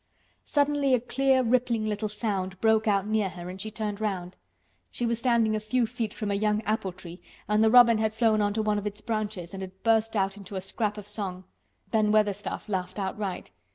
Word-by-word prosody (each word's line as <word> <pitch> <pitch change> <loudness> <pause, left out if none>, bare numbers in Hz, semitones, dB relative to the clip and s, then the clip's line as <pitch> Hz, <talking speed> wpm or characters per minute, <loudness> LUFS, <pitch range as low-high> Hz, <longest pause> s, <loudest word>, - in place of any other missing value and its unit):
Suddenly 285 -2 +2
a - - +1
clear 265 +2 +2
rippling 235 -2 +1
little 210 0 -2
sound 195 -3 -3
broke 220 0 +3
out 200 -2 +2
near 215 -2 +1
her 175 -1 -8
and 190 +1 -8
she 215 - -4
turned 215 -1 -4
round. 185 -4 -3 0.5
She 240 - -3
was 235 -1 0
standing 235 -3 +2
a - - 0
few 235 +3 +1
feet 225 -2 -3
from 210 -1 -4
a - - +1
young 210 +1 +1
apple 210 -3 -1
tree 175 0 -11 0.3
and 210 +1 +3
the 220 - +5
robin 235 -1 +7
had 220 0 0
flown 220 -2 +3
on 205 0 +2
to 220 - 0
one 210 -1 +1
of 205 - -4
its 210 +1 -6
branches 210 -6 -3
and 195 - -6
had 190 0 -9
burst 225 0 +2
out 195 0 0
into 200 0 -9
a 190 - -2
scrap 210 +2 -2
of 210 - -7
a - - -18
song. 195 -3 -5 0.5
Ben 215 -2 +3
Weatherstaff 210 -1 0
laughed 185 -2 -3
outright. 195 - -4
215 Hz, 220 wpm, -27 LUFS, 200-225 Hz, 0.5 s, robin